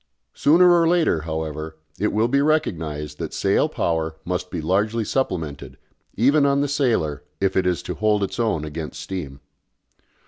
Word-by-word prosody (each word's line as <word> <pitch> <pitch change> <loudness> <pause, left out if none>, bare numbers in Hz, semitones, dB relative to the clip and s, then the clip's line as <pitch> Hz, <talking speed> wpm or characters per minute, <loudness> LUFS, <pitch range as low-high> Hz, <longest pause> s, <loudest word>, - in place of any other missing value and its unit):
Sooner 175 +4 +5
or 170 -1 +4
later, 165 - +2
however, 80 0 -4 0.2
it 105 - +2
will 110 +2 +2
be 140 +3 +2
recognised 80 - -1
that - - -5
sail - - +2
power 80 -1 -1
must 90 +1 -3
be 90 - -4
largely 105 +8 0
supplemented, 90 - -3 0.4
even 140 +7 +4
on 140 0 +3
the 145 - +1
"sailer," 120 - 0 0.2
if 95 -1 0
it 95 -1 +2
is 90 -3 0
to - - -4
hold 105 -1 +1
its 100 - -4
own 110 -10 0
against 75 0 -6
steam. 80 -5 -6
95 Hz, 165 wpm, -22 LUFS, 80-130 Hz, 0.4 s, Sooner